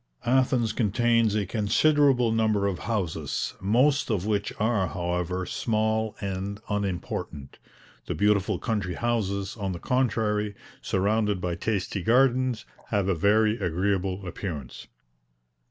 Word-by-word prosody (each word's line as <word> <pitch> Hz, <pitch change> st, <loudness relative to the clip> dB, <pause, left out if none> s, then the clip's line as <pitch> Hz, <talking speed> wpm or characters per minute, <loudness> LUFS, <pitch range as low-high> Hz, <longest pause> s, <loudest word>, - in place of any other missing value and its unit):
Athens 125 Hz, -3 st, +2 dB
contains 115 Hz, 0 st, +2 dB
a 105 Hz, -2 st, +1 dB
considerable 125 Hz, +4 st, +3 dB
number 110 Hz, -3 st, +2 dB
of 100 Hz, -3 st, -1 dB
houses, 100 Hz, -8 st, -2 dB
most 130 Hz, +9 st, +2 dB
of 100 Hz, -4 st, 0 dB
which 105 Hz, -1 st, 0 dB
are, 105 Hz, -3 st, +1 dB
however, 90 Hz, +1 st, -2 dB
small 110 Hz, +2 st, -1 dB
and 100 Hz, +1 st, -4 dB
unimportant; 90 Hz, -8 st, -4 dB, 0.5 s
the -, -, -2 dB
beautiful 105 Hz, -1 st, +2 dB
country 100 Hz, -4 st, -2 dB
houses, 100 Hz, -4 st, -1 dB
on 100 Hz, -3 st, -2 dB
the 85 Hz, -, -6 dB
contrary, 105 Hz, -4 st, 0 dB, 0.3 s
surrounded 105 Hz, +1 st, +1 dB
by 90 Hz, -1 st, -2 dB
tasty 100 Hz, +2 st, -2 dB
gardens, 125 Hz, +1 st, +2 dB, 0.2 s
have 100 Hz, -3 st, 0 dB
a 95 Hz, -, +2 dB
very 105 Hz, +5 st, +3 dB
agreeable 95 Hz, +1 st, -1 dB
appearance. 80 Hz, -8 st, -6 dB
105 Hz, 120 wpm, -26 LUFS, 95-115 Hz, 0.5 s, considerable